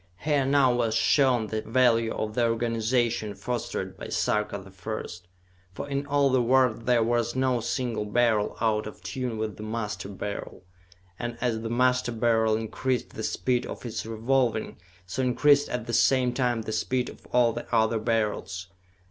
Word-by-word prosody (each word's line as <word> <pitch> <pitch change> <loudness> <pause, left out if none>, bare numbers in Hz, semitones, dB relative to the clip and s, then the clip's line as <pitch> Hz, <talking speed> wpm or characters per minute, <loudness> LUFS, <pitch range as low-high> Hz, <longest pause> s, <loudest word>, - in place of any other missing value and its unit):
Here 145 -3 +1
now 135 -2 +4
was 115 -2 0
shown 130 -6 +3
the 110 +1 -3
value 115 -1 +2
of 105 0 -3
the 120 0 +2
organization 115 -1 0
fostered 120 +1 -4
by - - -6
Sarka 105 -1 0
the 95 -1 -12
First 90 -2 -6 0.5
for 140 +9 -6
in 140 0 -2
all 140 -1 +3
the 130 -1 +3
world 125 -2 +2
there 120 -2 +4
was 120 0 0
no 130 -2 +1
single 115 -2 -2
Beryl 110 -1 +1
out 110 -2 +1
of 105 - -11
tune 125 -4 -3
with 110 -1 -3
the - - -9
Master 105 -3 -4
Beryl; 100 -1 -6 0.6
and 120 -1 -4
as 115 -2 -1
the 115 - -4
Master 125 +1 +2
Beryl 110 -1 +2
increased 120 +3 -2
the - - -7
speed 125 +2 0
of - - -8
its 115 - -4
revolving, 115 +1 0 0.3
so 90 +9 -3
increased 145 +3 +3
at 125 -2 -3
the 115 - -5
same 125 +2 +3
time 120 -3 0
the 110 - -5
speed 125 +3 0
of - - -12
all 120 -2 +4
the 120 - -7
other 110 -1 +2
Beryls. 105 -5 -1
115 Hz, 175 wpm, -27 LUFS, 110-125 Hz, 0.6 s, now